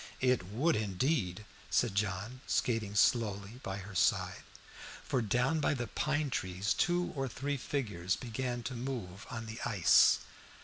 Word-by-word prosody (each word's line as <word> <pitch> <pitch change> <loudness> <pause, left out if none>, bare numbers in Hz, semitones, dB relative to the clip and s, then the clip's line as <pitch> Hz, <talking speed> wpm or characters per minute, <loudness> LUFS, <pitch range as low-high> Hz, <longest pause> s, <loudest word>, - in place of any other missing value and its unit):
"It 125 -8 +2
would 140 - +1
indeed," 105 - 0 0.2
said 120 -5 +2
John, 100 +5 -2
skating 110 -4 0
slowly 105 0 +2
by 95 -5 -4
her 100 +1 -8
side. 90 - +1 0.6
For 130 - 0
down 125 +8 +1
by 150 - +2
the 120 -2 -2
pine 150 +2 -1
trees 95 0 -1
two 175 0 +1
or 135 -1 -1
three 140 +4 -3
figures 105 -10 -2
began 120 0 -3
to 130 - -4
move 115 -6 -5
on 120 -2 -5
the 110 +1 -7
ice. 95 -7 +5
115 Hz, 145 wpm, -33 LUFS, 100-130 Hz, 0.6 s, ice